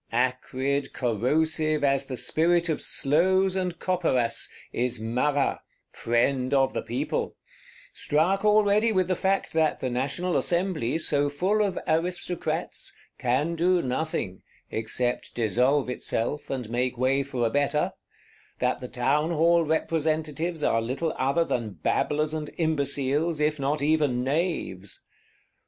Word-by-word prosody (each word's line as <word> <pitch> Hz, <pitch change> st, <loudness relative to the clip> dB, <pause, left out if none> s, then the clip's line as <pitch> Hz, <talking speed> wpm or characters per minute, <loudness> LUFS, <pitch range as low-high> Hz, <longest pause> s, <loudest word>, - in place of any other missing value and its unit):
Acrid, 130 Hz, +3 st, -1 dB
corrosive, 155 Hz, +6 st, 0 dB
as 140 Hz, -1 st, +2 dB
the 130 Hz, -, -5 dB
spirit 170 Hz, +4 st, +2 dB
of 155 Hz, -, -1 dB
sloes 185 Hz, +6 st, +2 dB
and 180 Hz, -2 st, -2 dB
copperas, 145 Hz, -11 st, +1 dB, 0.2 s
is 125 Hz, -1 st, -1 dB
Marat, 125 Hz, +6 st, 0 dB, 0.3 s
Friend 125 Hz, +3 st, 0 dB
of 135 Hz, -1 st, +3 dB
the -, -, -1 dB
People; 120 Hz, +2 st, -3 dB, 0.6 s
struck 175 Hz, +7 st, +1 dB
already 210 Hz, +1 st, +4 dB
with 185 Hz, -4 st, +1 dB
the 185 Hz, -, +1 dB
fact 190 Hz, +2 st, 0 dB
that 160 Hz, -1 st, +2 dB
the 130 Hz, -, -2 dB
National 140 Hz, +8 st, -1 dB
Assembly, 170 Hz, -7 st, 0 dB
so 145 Hz, -3 st, +1 dB
full 185 Hz, +9 st, +1 dB
of 200 Hz, -3 st, 0 dB
Aristocrats, 175 Hz, +1 st, -2 dB, 0.2 s
"can 135 Hz, +7 st, +1 dB
do 175 Hz, +1 st, +2 dB
nothing," 125 Hz, -, -2 dB, 0.3 s
except 120 Hz, +2 st, -2 dB
dissolve 125 Hz, +5 st, +2 dB
itself, 125 Hz, +3 st, -3 dB
and 130 Hz, -4 st, -3 dB
make 125 Hz, +1 st, -1 dB
way 130 Hz, +2 st, +2 dB
for 130 Hz, -3 st, -2 dB
a 115 Hz, -, 0 dB
better; 145 Hz, +2 st, +1 dB, 0.6 s
that 125 Hz, 0 st, 0 dB
the 125 Hz, -, -5 dB
Townhall 155 Hz, +7 st, +2 dB
Representatives 160 Hz, 0 st, -1 dB
are 115 Hz, -, +2 dB
little 135 Hz, +8 st, -2 dB
other 135 Hz, +6 st, +1 dB
than 115 Hz, -9 st, -2 dB
babblers 150 Hz, -, 0 dB
and 155 Hz, -1 st, -3 dB
imbeciles, 150 Hz, 0 st, 0 dB
if 150 Hz, 0 st, +1 dB
not 140 Hz, +1 st, -1 dB
even 145 Hz, -5 st, +2 dB
knaves. 135 Hz, -, -2 dB
145 Hz, 130 wpm, -26 LUFS, 125-165 Hz, 0.6 s, already